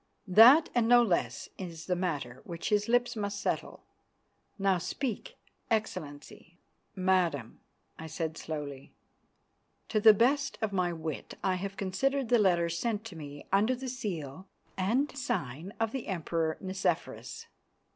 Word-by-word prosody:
That 235 - +8
and 240 -2 +2
no 240 0 +7
less 185 -7 -1
is 170 -4 -7
the 180 - 0
matter 145 -9 -3
which 170 -1 -5
his 210 0 +2
lips 245 +1 +2
must 205 -2 -3
settle. - - -3 0.7
Now 195 -2 +2
speak, 275 - -4 0.3
Excellency." 175 -6 -4 0.4
"Madam," 180 - 0 0.4
I 160 - -6
said 160 0 -3
slowly, 145 -4 -6 0.9
"to 215 - +1
the 215 0 +8
best 275 +5 +2
of 220 -3 -2
my 180 -2 +1
wit 160 -3 -5
I 190 - +2
have 195 +2 -4
considered 255 +7 0
the 240 -1 +5
letter 175 -4 +3
sent 210 +6 -2
to 215 -6 -8
me 145 -2 -9
under 215 +6 +3
the 260 +1 -6
seal 185 - -5 0.3
and 240 +11 0
sign 180 - -3
of 225 -1 0
the 265 -2 -5
Emperor 165 -3 -1
Nicephorus. 190 0 -3
190 Hz, 140 wpm, -30 LUFS, 165-225 Hz, 0.9 s, That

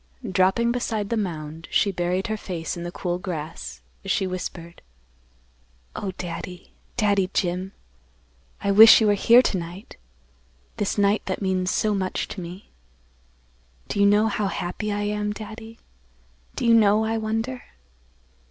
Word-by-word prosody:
Dropping 190 +5 +2
beside 220 -4 -2
the - - +2
mound 165 -6 -4
she 200 - +2
buried 180 +1 -1
her 220 - -2
face 175 -6 -5
in 170 - -7
the 175 0 -5
cool 175 0 -3
grass, 150 - -6 0.2
as - - -7
she 195 - +1
whispered, 175 -2 -6 1.1
"Oh, 195 - -3
Daddy, 180 0 -7 0.2
Daddy 200 -4 +2
Jim! 180 +1 -1 0.9
I 200 - +1
wish 220 +3 +9
you 220 - +2
were 205 - +4
here 235 +5 +6
to 190 - 0
night; 175 +4 -9 0.8
this 205 - -1
night 205 +1 +2
that 185 - -2
means 185 -2 0
so 215 +2 +1
much 190 -2 -2
to 190 - -6
me. 180 +3 -10 1.2
Do - - -2
you 200 - +6
know 210 +2 +4
how 210 -1 0
happy 195 +3 -3
I 205 0 -1
am, 210 0 -1
Daddy? 220 +1 -9 0.8
Do - - -2
you 235 - +5
know, 215 -1 +5
I 225 0 -1
wonder?" 225 +4 -2
200 Hz, 150 wpm, -24 LUFS, 180-215 Hz, 1.2 s, wish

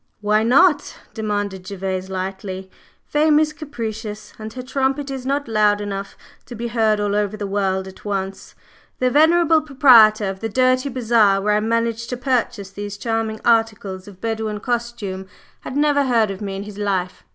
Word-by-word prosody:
"Why 210 +1 +2
not?" 280 +7 +3 0.2
demanded 205 -4 -3
Gervase, 190 -1 -4
lightly. 190 0 -5 0.3
"Fame 300 0 +3
is 310 0 +2
capricious, 220 -7 -6
and 215 0 -7
her 255 - -6
trumpet 270 +2 -1
is 260 -1 -5
not 280 0 -1
loud 210 -2 +3
enough 200 -1 -5 0.3
to 245 - -8
be 235 +1 -4
heard 220 -2 +2
all 205 0 0
over 210 0 -1
the 205 - -4
world 190 -1 -1
at 190 - -13
once. 195 -1 -4 0.4
The 255 0 +1
venerable 320 +2 +4
proprietor 240 -8 +6
of 190 0 -4
the 225 - -3
dirty 255 +3 +2
bazaar 225 -6 +3
where 210 +1 +1
I 210 - +3
managed 230 +1 -1
to 250 - -3
purchase 240 -6 -1
these 205 0 -6
charming 225 0 -2
articles 215 -5 +1
of 195 -2 -13
Bedouin 220 -1 -3
costume 230 -5 -3 0.3
had 260 - -6
never 290 -1 +3
heard 230 -5 +2
of 195 - -7
me 195 -2 -4
in 195 - -5
his 210 0 -10
life. 190 -3 -2
220 Hz, 175 wpm, -21 LUFS, 200-250 Hz, 0.4 s, proprietor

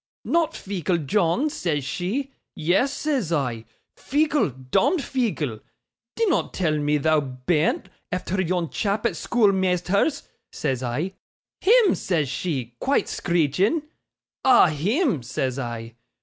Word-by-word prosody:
"Not 330 -1 +1
feeckle, 185 -3 -1
John," 205 - +1
says 155 - -1
she. 235 - -2 0.2
"Yes," 180 - +2
says 280 - -1
I, 125 -8 -1 0.3
"feeckle, 295 - +1 0.2
dom'd 290 - +3
feeckle. 200 - -1 0.6
Dinnot 450 -5 +1
tell 165 -5 +1
me 150 0 +1
thou 155 +2 +3
bean't, 140 +4 0 0.2
efther 185 +1 -1
yon 175 -2 -1
chap 210 +1 -1
at - - +3
schoolmeasther's," 195 - +1 0.3
says 130 -4 -2
I. 130 +10 -2 0.5
"Him!" 445 -1 +5
says 155 -7 -1
she, 130 -5 -3
quite 275 +2 +1
screeching. 175 - +1 0.6
"Ah! 260 -9 +6
him!" 195 - 0
says 130 +2 -2
I. 115 -2 -5
180 Hz, 120 wpm, -24 LUFS, 145-245 Hz, 0.6 s, Ah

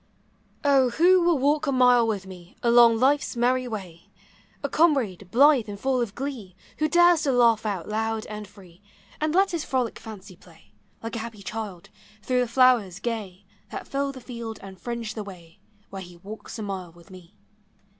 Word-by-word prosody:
0 275 -3 +4
who 355 +8 +4
will 340 -2 +3
walk 290 +3 +1
a - - +2
mile 250 -2 +4
with 205 -4 -2
me 180 -1 -13
Along 235 -1 +6
life's 275 +4 +2
merry 250 +1 +1
way? 185 -7 -8 0.5
A - - +1
comrade 250 - +1
blithe 260 -1 +4
and 200 -1 -7
full 260 0 0
of 225 -3 -3
glee, 245 -9 -6 0.2
Who 310 - +2
dares 345 0 +5
to 290 -3 +1
laugh 230 -3 +3
out 190 -5 -3
loud 220 +1 -2
and 210 -1 -7
free, 190 -3 -18 0.4
And 310 +1 -1
let 390 +1 +3
his 335 -3 -2
frolic 255 -3 -2
fancy 200 -3 -11
play, 160 - -21 0.3
Like 225 +1 -5
a - - -3
happy 220 -2 -8
child, 210 -5 -6 0.3
through 255 -1 +1
the 250 - +1
flowers 235 -6 +3
gay 200 -4 -5 0.2
That - - -7
fill 275 0 -2
the 265 - -10
field 235 -2 -7
and 190 -1 -11
fringe 235 -2 -4
the 215 - -5
way 175 -5 -13 0.3
Where 195 -1 -6
he 175 -1 -12
walks 205 +6 -9
a 220 - -5
mile 190 -4 -5
with 175 +3 -19
me. 185 +1 -14
225 Hz, 185 wpm, -25 LUFS, 195-260 Hz, 0.5 s, Along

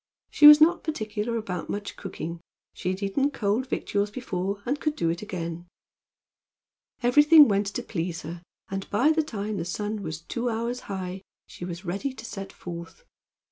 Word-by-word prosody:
She 295 - +8
was 300 0 +11
not 325 +2 +5
particular 225 -6 -2
about 180 -6 -4
much 205 0 -4
cooking. 170 -3 -6 0.3
She 180 - -3
had 185 +2 -3
eaten 270 +9 +1
cold 240 -1 -1
victuals 205 -4 -1
before, 200 -3 -4
and 280 +4 -1
could 305 +1 -1
do 165 - +1
it 170 - -4
again. 175 -4 -5 1.4
Everything 295 +4 +8
went 200 -1 +1
to 200 - -3
please 170 -1 -4
her, 170 +2 -7 0.3
and 195 0 -5
by 250 +10 +3
the 315 0 +3
time 215 -7 -4
the 170 - -2
sun 210 +4 -3
was 160 -3 -5
two 235 +8 -3
hours 235 +2 -2
high 190 -1 -4 0.2
she 175 - -9
was 175 +1 -7
ready 200 +10 -3
to 225 - -9
set 195 -3 -7
forth. 170 - -9
205 Hz, 175 wpm, -26 LUFS, 180-245 Hz, 1.4 s, was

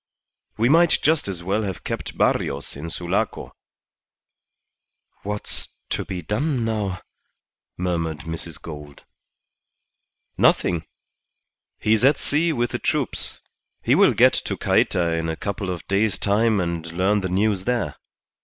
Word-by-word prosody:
We 115 +2 +3
might 165 +4 +5
just 155 -5 +3
as 90 -3 -4
well 100 +4 0
have 95 -4 -4
kept - - -4
Barrios 70 +1 0
in 75 +4 -6
Sulaco." 85 +1 -2 1.7
"What's 105 +1 -3 0.2
to - - -1
be 90 -2 -5
done 125 - 0
now?" 105 -5 -2 0.8
murmured 85 -4 -1
Mrs. 80 -1 -6
Gould. 75 -3 -10 1.4
"Nothing. 85 -3 +3 0.9
He's 110 +1 +2
at 140 +2 +5
sea 160 +3 +1
with 120 -5 0
the - - -2
troops. - - -2 0.4
He - - +3
will - - +5
get - - +6
to - - -2
Cayta 85 -1 +2
in 80 0 -2
a 80 - -1
couple 100 +1 -4
of 90 -2 -5
days' 100 -2 +1
time 105 +1 +2
and 85 -2 -2
learn 95 +4 +2
the 95 - -2
news 95 +1 +1
there. 120 -3 0
95 Hz, 135 wpm, -23 LUFS, 85-110 Hz, 1.7 s, get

